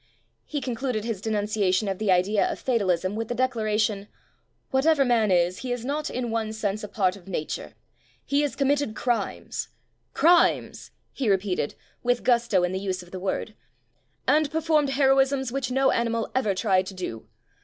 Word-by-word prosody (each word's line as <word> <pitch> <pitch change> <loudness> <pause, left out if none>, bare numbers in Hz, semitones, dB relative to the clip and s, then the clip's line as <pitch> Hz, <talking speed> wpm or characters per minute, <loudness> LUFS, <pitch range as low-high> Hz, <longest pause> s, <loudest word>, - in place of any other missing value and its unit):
He 295 -2 -3
concluded 245 -3 -2
his 225 -5 -3
denunciation 210 -2 0
of 195 -1 -2
the 215 -3 +1
idea 190 +3 +2
of - - -4
fatalism 195 -6 0
with 225 0 -3
the 240 - -3
declaration: 215 -5 0 0.6
"Whatever 275 +1 +3
man 230 -4 +3
is, 180 0 +2
he 255 -1 -4
is 245 -1 -3
not 295 +3 -2
in 245 -2 -3
one 220 -1 -2
sense 215 -1 -2
a - - -4
part 190 -3 0
of 195 -2 -15
nature. 165 -5 -4 0.5
He 280 +1 +2
has 290 -2 -1
com 275 -1 +1
mitted 285 -6 0
crimes, 240 -2 -2 0.5
crimes", 345 +1 +3 0.2
he 255 -6 -1
repeated 190 -6 0
— - - -37
with 245 0 +1
gusto 235 -6 +3
in 180 - +1
the 190 - -2
use 185 -2 -3
of 175 - -17
the 185 - -6
word 195 +3 -3 0.4
— - - -43
"and 305 -1 +3
performed 310 -2 +1
heroisms 270 -1 +2
which 265 -1 -2
no 265 +1 +3
animal 230 -1 -1
ever 215 -7 +1
tried 190 -1 +2
to 195 - -7
do. 115 -12 -6
225 Hz, 180 wpm, -25 LUFS, 195-265 Hz, 0.6 s, Whatever